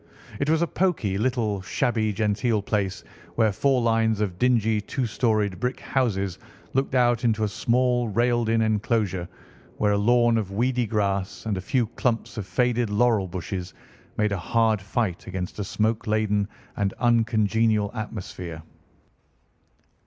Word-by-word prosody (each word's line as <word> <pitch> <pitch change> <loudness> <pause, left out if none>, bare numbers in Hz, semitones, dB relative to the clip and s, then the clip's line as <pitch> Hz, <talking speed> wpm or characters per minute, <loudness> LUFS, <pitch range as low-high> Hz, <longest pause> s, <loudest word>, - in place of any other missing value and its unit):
It 140 - 0
was 160 +1 +3
a - - +1
poky, 155 - 0
little, 110 -5 0
shabby 110 +1 0
genteel 105 +1 0
place, 100 -3 -1 0.3
where 110 -2 +3
four 130 +4 +1
lines 115 -2 +2
of 95 -4 -2
dingy 115 -4 +2
two 130 +5 -2
storied 110 -4 0
brick 125 +1 -2
houses 100 -8 -1 0.3
looked 135 0 0
out 120 -1 +3
into 110 -2 +2
a - - +2
small 120 +3 +1
railed 120 +2 +1
in 115 0 +3
enclosure, 105 -4 0 0.5
where 105 - +2
a 100 - +2
lawn 120 +1 +4
of 100 -3 -4
weedy 120 +3 0
grass 100 -1 -1
and 110 -2 -1
a 95 - -3
few 120 +5 +1
clumps 115 +1 -2
of 95 - -5
faded 120 +3 +1
laurel 105 -2 +2
bushes 90 +1 -5 0.4
made 105 -1 +1
a 100 - -1
hard 110 +2 +1
fight 95 -2 -2
against 95 +1 -5
a - - 0
smoke 110 +3 -1
laden 105 -1 +1 0.3
and 100 -1 -1
uncongenial 110 -2 +2
atmosphere. 90 -7 -6
110 Hz, 150 wpm, -25 LUFS, 100-120 Hz, 0.5 s, lawn